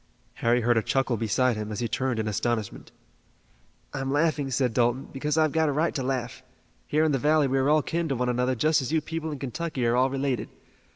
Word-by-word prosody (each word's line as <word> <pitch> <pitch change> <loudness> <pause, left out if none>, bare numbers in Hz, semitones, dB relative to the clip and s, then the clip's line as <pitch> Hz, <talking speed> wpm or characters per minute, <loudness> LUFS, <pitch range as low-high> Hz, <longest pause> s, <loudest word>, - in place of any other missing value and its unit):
Harry 120 +1 +3
heard 120 0 +2
a - - +3
chuckle 135 +1 0
beside 115 +3 +1
him 105 0 -5
and 105 - -4
he 120 - -1
turned 130 +2 -1
in 110 -1 -2
astonishment. 110 0 -2 1.0
"I'm 135 0 -3
laughing," 145 -1 +1
said 125 -2 0
Dalton, 120 +2 +1
"because 150 +3 -1
I've 155 -2 +3
got 160 0 +2
a - - +1
right 155 +4 0
to 140 - -2
laugh. 125 -2 -3 0.5
Here 155 +1 +2
in 160 - +2
the 135 - +1
valley 150 +2 +3
we 135 +1 +1
are 135 +2 +2
all 155 -1 +4
kin 170 0 -2
to 135 - 0
one 125 0 -1
another 125 +1 +1
just 155 +5 +2
as 130 - -4
you 160 - +3
people 160 +1 -5
in 145 - -5
Kentucky 135 0 -3
are 115 +1 +2
all 130 +2 +3
related. 135 -4 -2
135 Hz, 230 wpm, -26 LUFS, 120-150 Hz, 1.0 s, all